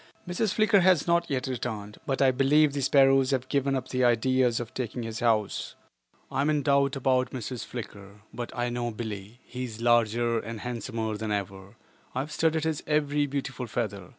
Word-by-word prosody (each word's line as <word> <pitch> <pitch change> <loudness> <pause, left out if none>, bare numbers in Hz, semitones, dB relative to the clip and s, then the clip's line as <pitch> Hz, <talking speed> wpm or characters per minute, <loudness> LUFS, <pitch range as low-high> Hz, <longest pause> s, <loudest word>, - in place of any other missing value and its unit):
Mrs. 190 +3 -1
Flicker 215 -2 +4
has 180 -4 +4
not 170 0 +2
yet 130 -3 -1
returned, 110 -5 -5
but 135 0 +1
I 130 - +5
believe 140 +3 +3
the 140 - -2
sparrows 135 -1 +4
have 130 -2 -1
given 140 -1 +1
up 130 -1 -4
the 130 0 0
idea 125 +2 +3
of 120 0 -3
taking 125 -1 -4
his 115 -1 -5
house. 110 -3 0 0.6
I 135 - 0
am 145 - +2
in 150 -2 +1
doubt 140 0 +3
about 130 -1 +1
Mrs. 125 -1 -5
Flicker, 100 -4 -9
but 120 -1 -5
I 120 0 0
know 120 0 -2
Billie. 110 0 -7
He 125 +1 -6
is 115 -2 -8
larger 120 0 +2
and 110 -1 -7
handsomer 115 -3 -3
than 110 0 -4
ever. 100 0 -4 0.4
I 130 - +1
have 150 +3 -7
studied 160 0 +1
his 160 -2 -1
every 145 -1 +1
beautiful 135 -2 -4
feather. 105 -5 -3
125 Hz, 190 wpm, -27 LUFS, 115-140 Hz, 0.6 s, I